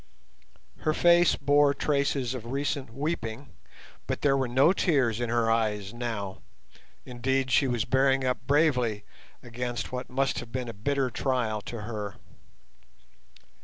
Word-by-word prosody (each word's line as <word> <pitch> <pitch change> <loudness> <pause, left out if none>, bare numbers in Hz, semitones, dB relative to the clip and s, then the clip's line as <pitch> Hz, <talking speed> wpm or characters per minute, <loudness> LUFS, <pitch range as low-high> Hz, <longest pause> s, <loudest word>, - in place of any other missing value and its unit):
Her 155 0 0
face 175 0 +5
bore 145 0 +3
traces 140 -4 0
of 120 -3 -7
recent 140 -2 -2
weeping, 140 -2 -4 0.5
but - - -3
there 140 -2 +4
were 135 -2 0
no 135 +8 +4
tears 135 - +1
in 120 - -1
her 115 -1 +2
eyes 105 -3 0
now, 110 -5 -4 0.6
indeed 130 +1 -1
she 135 +2 +4
was 120 -3 0
bearing 135 0 +2
up 125 -1 -2
bravely 125 -8 +2 0.4
against 120 +1 -4
what 125 0 -5
must 135 +1 0
have 115 - -9
been 125 0 -3
a - - -6
bitter 130 +5 -1
trial 120 -5 -1
to 115 -2 -5
her. 105 -2 -5
125 Hz, 140 wpm, -27 LUFS, 115-140 Hz, 0.6 s, face